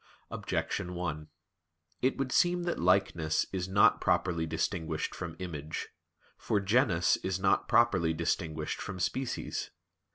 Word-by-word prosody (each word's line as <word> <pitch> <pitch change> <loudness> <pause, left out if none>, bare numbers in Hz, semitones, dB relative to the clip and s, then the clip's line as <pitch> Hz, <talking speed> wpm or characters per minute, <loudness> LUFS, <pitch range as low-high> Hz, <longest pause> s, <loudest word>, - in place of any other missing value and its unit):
Objection 90 0 -3
1: 80 -4 -4 0.7
It 130 +1 +1
would 135 -1 -2
seem 175 +4 +3
that 175 0 -2
"likeness" 90 -3 +2
is 90 -1 -2
not 100 +2 +5
properly 85 -2 +1
distinguished 80 +1 -2
from 85 -3 -6
"image." 80 -4 -5 0.5
For 105 - +1
genus 95 -5 +3
is 95 0 -2
not 95 0 +2
properly 95 -9 +3
distinguished 80 -1 -2
from 95 -1 -6
species. 125 +6 -2
90 Hz, 125 wpm, -30 LUFS, 80-100 Hz, 0.7 s, not